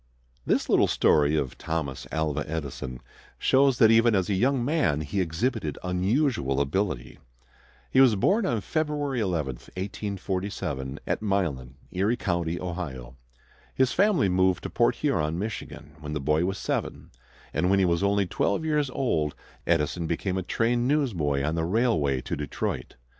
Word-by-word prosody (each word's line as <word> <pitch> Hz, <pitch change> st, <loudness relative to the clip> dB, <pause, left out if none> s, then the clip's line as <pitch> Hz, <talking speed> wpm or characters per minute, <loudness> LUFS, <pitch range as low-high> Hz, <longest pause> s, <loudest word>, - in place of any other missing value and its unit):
This -, -, +1 dB
little -, -, +4 dB
story 75 Hz, 0 st, +3 dB
of 70 Hz, -5 st, -2 dB
Thomas 80 Hz, -5 st, -3 dB
Alva 75 Hz, -2 st, -1 dB
Edison 70 Hz, -5 st, -5 dB, 0.4 s
shows 135 Hz, -1 st, +3 dB
that 110 Hz, -1 st, +6 dB
even 115 Hz, 0 st, +5 dB
as 95 Hz, 0 st, +1 dB
a -, -, +2 dB
young 125 Hz, +5 st, +2 dB
man 145 Hz, -, +1 dB
he 75 Hz, +6 st, -1 dB
exhibited 90 Hz, -, -1 dB
unusual 90 Hz, -, +1 dB
ability. 70 Hz, -2 st, -2 dB, 0.7 s
He 130 Hz, -, +5 dB
was 125 Hz, -5 st, +6 dB
born 200 Hz, -, +2 dB
on 115 Hz, -3 st, 0 dB
February 145 Hz, -, -1 dB
11, 80 Hz, -, -1 dB
1847, 95 Hz, -8 st, -4 dB
at -, -, -1 dB
Milan, 80 Hz, -12 st, -1 dB, 0.2 s
Erie 100 Hz, +6 st, +1 dB
County, 85 Hz, -5 st, -1 dB
Ohio. 75 Hz, -10 st, -5 dB, 0.6 s
His 130 Hz, -1 st, +3 dB
family 195 Hz, -, +3 dB
moved 95 Hz, -1 st, +2 dB
to -, -, -5 dB
Port -, -, +2 dB
Huron, 75 Hz, +2 st, 0 dB
Michigan, 100 Hz, -7 st, -6 dB
when 75 Hz, -1 st, -6 dB
the 75 Hz, -, -1 dB
boy 75 Hz, +4 st, +1 dB
was 95 Hz, +1 st, -2 dB
seven, -, -, -3 dB, 0.4 s
and 90 Hz, -, +1 dB
when 100 Hz, -, +4 dB
he 95 Hz, -, +3 dB
was 85 Hz, 0 st, +1 dB
only 100 Hz, 0 st, +2 dB
twelve 100 Hz, -, 0 dB
years 150 Hz, -3 st, +1 dB
old 80 Hz, -, -1 dB, 0.3 s
Edison 85 Hz, 0 st, +1 dB
became 90 Hz, +3 st, -1 dB
a -, -, -2 dB
train 120 Hz, +6 st, 0 dB
newsboy 90 Hz, -, +1 dB
on 75 Hz, +2 st, 0 dB
the 80 Hz, 0 st, -1 dB
railway 80 Hz, -, +1 dB
to -, -, -3 dB
Detroit. 75 Hz, -2 st, -4 dB
90 Hz, 155 wpm, -26 LUFS, 75-115 Hz, 0.7 s, that